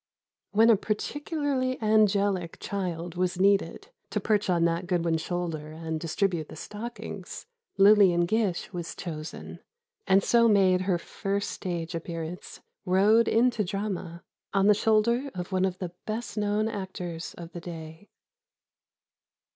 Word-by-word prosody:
When 225 +3 +5
a - - +7
particularly 265 - -2
angelic 205 -5 +2
child 175 -4 -4
was 180 0 -1
needed, 200 - +2 0.2
to - - -1
perch 210 -2 +1
on 170 -2 +3
Nat 170 +1 0
Goodwin's 170 -2 +1
shoulder 165 -4 -4
and 160 0 -4
distribute 170 -1 -1
the - - -9
stockings, 230 +3 -7 0.3
Lillian 195 -4 +6
Gish 200 -2 -1
was 175 -2 -5
chosen, 155 -2 -7 0.5
and 195 +1 +5
so 235 -1 +4
made 190 -4 +4
her 185 -2 +1
first 200 +3 -3
stage 170 -2 -4
appearance—rode 180 +5 0
into 235 0 +3
the 200 - -2
drama—on 195 -1 -3
the 210 - +7
shoulder 225 +5 +2
of 180 +1 -5
one 185 0 +2
of 185 -1 -2
the 180 -2 -5 0.2
best 220 +1 -4
known 210 0 0
actors 185 -5 -5
of 170 -1 -9
the 175 - -8
day. 165 +2 -9
190 Hz, 130 wpm, -27 LUFS, 170-210 Hz, 0.5 s, a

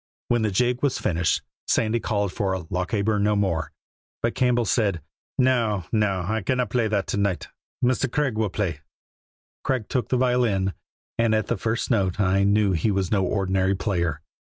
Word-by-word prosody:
When 120 -1 +2
the 110 - +1
jig 125 +5 +1
was 140 -3 +1
finished 85 -1 0 0.2
Sandy 115 +1 +2
called 100 -4 -1
for 95 -2 0
"Lochaber 100 +4 0
No 105 +1 +2
More," 85 -7 0 0.5
but 115 - +1
Campbell 125 -2 +2
said: 100 -6 +1 0.4
"No! 115 -7 +2
no! 105 -5 +1
I 110 +1 0
cannot 125 +2 0
play 120 -3 +2
that 105 -2 0
to - - -1
night. 100 -3 -1 0.4
Mr. 130 0 +1
Craig 145 -5 0
will 110 -1 0
play." 90 -6 -2 0.8
Craig 130 -5 -1
took 125 -3 -1
the 130 - +2
violin, 120 -7 +2 0.5
and 115 -1 +3
at 110 - +1
the 120 - +2
first 115 +5 -2
note 95 -4 +1
I 100 -1 +3
knew 100 0 +3
he 95 +5 +1
was 95 -3 0
no 100 -3 +2
ordinary 95 0 +1
player. 85 -6 -1
105 Hz, 175 wpm, -24 LUFS, 95-120 Hz, 0.8 s, and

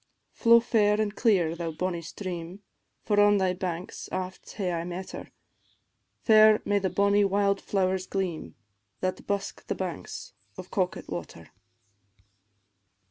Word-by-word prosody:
"Flow 235 0 +6
fair 215 -3 +2
an' 215 -1 +1
clear, 190 -7 +2
thou 170 -1 -3
bonnie 170 +2 -3
stream, 180 +2 -7 0.4
For 205 -2 +2
on 205 0 +6
thy 190 -2 +1
banks 180 -1 -5
aft 185 0 -5
hae 190 -4 -2
I 165 -1 -2
met 180 +2 -6
her; - - -8 0.9
Fair 215 -1 +7
may 205 0 +2
the 190 -1 -1
bonnie 200 +1 +3
wild 200 0 +1
flowers 185 -1 0
gleam, 185 -5 -3 0.5
That 185 0 -3
busk 200 -1 -3
the - - -1
banks - - -6 0.2
of - - -9
Coquet 185 -4 -1
water." 85 -2 -7
190 Hz, 135 wpm, -27 LUFS, 180-205 Hz, 0.9 s, Fair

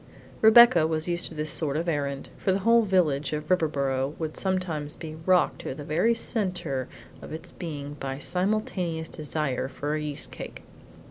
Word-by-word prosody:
III - - -21
Rebecca 220 -7 +8
was 160 0 -2
used 175 0 +3
to 160 - -9
this 150 0 -1
sort 150 -3 +2
of 165 +2 -2
errand, 140 -4 -2
for 190 - 0
the 190 - +2
whole 230 0 +6
village 170 -9 +1
of 150 0 -3
Riverboro 140 -5 0
would 160 -2 -4
sometimes 175 -6 -2
be 155 -1 -8
rocked 185 -1 +3
to - - -5
the 145 - -7
very 175 +11 +2
centre 180 - -2 0.3
of - - -10
its 160 +1 -5
being 145 -4 -6
by 135 0 -4
simultaneous 180 -2 -1
desire 150 -4 -2
for 145 +2 -4
a 155 - -1
yeast 150 -1 -3
cake. - - -8
155 Hz, 180 wpm, -26 LUFS, 145-185 Hz, 0.3 s, Rebecca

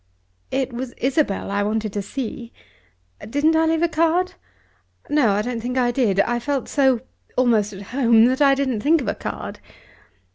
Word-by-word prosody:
"It 265 -2 -2
was 245 +1 -5
Isabel 260 -7 0
I 200 0 0
wanted 215 0 -2
to 205 - -2
see. 235 +1 -6 0.8
Didn't 295 +6 +2
I 320 0 +3
leave 325 +1 +1
a - - +4
card? 335 +3 +1 0.8
No; 295 -6 +3
I 205 +1 0
don't 240 0 -3
think 250 +2 -3
I 245 -1 +2
did. 230 -6 +1
I 240 +2 0
felt 275 +1 -2
so 265 -5 +2 0.4
almost 225 -5 +2
at 195 0 -9
home, 235 -4 +5
that 260 +3 +1
I 275 -1 +5
didn't 260 -6 -1
think 315 +4 +3
of 245 - -5
a - - 0
card." - - -6
250 Hz, 180 wpm, -22 LUFS, 225-285 Hz, 0.8 s, home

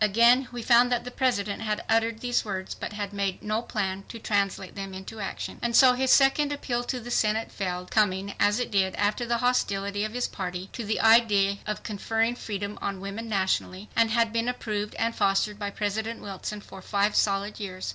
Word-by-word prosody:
Again 235 +5 +5
we 240 -1 -6
found 245 +1 +5
that 245 -1 +1
the 250 - -7
President 225 -7 0
had 215 -1 -2
uttered 225 0 +1
these 245 -1 +1
words 190 -3 -4
but - - -6
had 205 -1 -4
made 200 -2 -2
no 215 +1 0
plan 195 -4 -3
to 230 - -7
translate 200 -4 -1
them 195 -1 -6
into 190 +4 -8
action. 195 - -5
And 235 -1 0
so 255 0 +8
his 260 +1 0
second 285 +2 +5
appeal 245 -4 -2
to 250 - -2
the 240 +1 -8
Senate 220 0 +1
failed, 180 -2 -4
coming 200 -2 +1
as 205 +2 +3
it 245 - -2
did 190 -2 +1
after 210 +4 0
the 235 0 +1
hostility 200 -4 0
of 215 0 -3
his 245 0 -1
party 180 0 -5
to 240 - -4
the 215 +1 -1
idea 210 -3 +4
of 210 - -3
conferring 225 +2 -1
freedom 205 -3 -5
on 195 -1 -3
women 200 +4 -6
nationally, 190 0 -1
had 230 0 +2
been 230 +1 0
approved 210 -4 -3
and 230 +1 0
fostered 200 +2 +1
by 205 -1 -2
President 220 +3 -3
Wilson 205 +1 -6
for 195 -1 -12
five 205 +2 +1
solid 200 +1 +1
years. 185 -3 -5
210 Hz, 200 wpm, -27 LUFS, 200-230 Hz, -, so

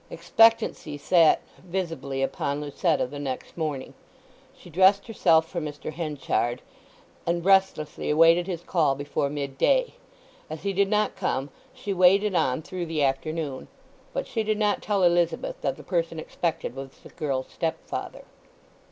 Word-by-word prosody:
Expectancy 175 -4 +2
sat 165 +1 +4 0.2
visibly 165 -7 -3
upon 140 +1 -2
Lucetta 150 +2 0
the 145 +3 -8
next 135 -3 -5
morning. 150 -5 -3 0.6
She 235 - -15
dressed 190 +4 +4
herself 165 -8 +3
for 170 0 -4
Mr. 150 0 -6
Henchard, 145 -6 -2 0.6
and 170 0 0
restlessly 190 -6 +2
awaited 165 +3 +5
his 175 -3 -4
call 155 -6 +2
before 140 0 -2
mid 140 -2 -5
day; - - +3 0.6
as 155 0 -7
he 200 -1 -1
did 195 +1 +2
not 210 0 +1
come 135 +2 -2 0.2
she 205 - -4
waited 190 +3 +4
on 160 -4 +1
through 180 0 -5
the 160 -2 0
afternoon. 140 0 -2 0.4
But - - -3
she 225 - -2
did 215 0 0
not 210 -1 +1
tell 200 -3 0
Elizabeth 175 - +1
that - - -1
the - - -11
person 165 -3 -1
expected 160 -5 -3
was 135 0 -6
the - - -12
girl's 140 -5 -3
stepfather. 165 -1 -4
165 Hz, 150 wpm, -26 LUFS, 145-190 Hz, 0.6 s, awaited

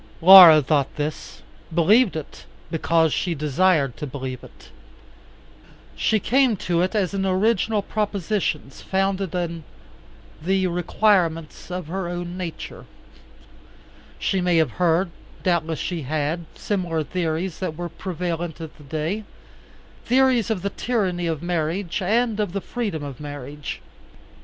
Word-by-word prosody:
Laura 170 -4 +10
thought 140 -1 0
this, 150 +1 -5 0.3
believed 195 +7 +4
it; 155 -2 -7 0.3
because 165 -1 +2
she 175 -2 -1
desired 150 -2 +2
to 150 - -6
believe 130 -2 -6
it. - - -15 1.3
She 215 - +1
came 250 +1 +2
to 175 -2 0
it 185 +4 -1
as 200 -3 0
an 195 -1 -1
original 205 +2 +1
proposition 200 -8 -2
founded 195 +2 -2
on 170 -2 -3 0.8
the 190 +3 +1
requirements 175 -3 0
of 180 -1 -4
her 180 +3 -4
own 175 0 -5
nature. 180 -3 -7 1.3
She 190 -2 0
may 180 -1 +2
have 160 -2 +2
heard, 175 0 +1 0.3
doubtless 165 -3 0
she 175 +1 -3
had, 155 +4 -2
similar 175 -6 -2
theories 165 +2 -3
that 165 -5 -4
were 175 0 -4
prevalent 175 -2 -4
at 160 -2 -8
that 145 -2 -15
day, 160 +9 -2 0.8
theories 255 -3 +3
of 200 -5 -2
the 200 - -1
tyranny 185 -8 -1
of 160 -1 -3
marriage 175 +2 -2
and 220 +3 +1
of 205 -4 -1
the 200 - -2
freedom 205 -12 -4
of 140 -3 -7
marriage. 145 0 -7
175 Hz, 135 wpm, -23 LUFS, 160-195 Hz, 1.3 s, Laura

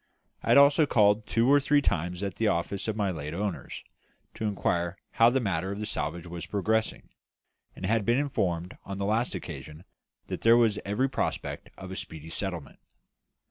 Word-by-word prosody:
I - - -9
had - - +6
also 145 +2 +6
called 105 -3 +3
two 115 +1 +2
or 145 +1 +6
three 145 +1 +3
times 90 - -1
at 100 -1 -4
the 110 - +1
office 95 +3 -1
of 110 - -1
my 100 -3 0
late 75 -1 -5
owners, 100 0 -4 0.5
to 110 - -4
inquire 90 -3 -1
how 115 +1 +5
the 135 +2 +1
matter 95 -5 -1
of 100 - -5
the 105 - -3
salvage 85 -4 -3
was 85 -1 -7
progressing, 110 +2 -1 0.7
and - - -6
had 110 +2 +2
been 120 +4 +2
informed 90 -11 -1
on 100 -1 -6
the 100 - -2
last 110 +2 0
occasion 75 -2 -8 0.4
that - - -5
there 115 +1 +6
was 115 -3 +3
every 105 +7 +1
prospect 135 - -3
of 95 -1 -8
a - - -5
speedy 80 -3 -7
settlement. 85 -5 -4
100 Hz, 185 wpm, -28 LUFS, 85-115 Hz, 0.7 s, had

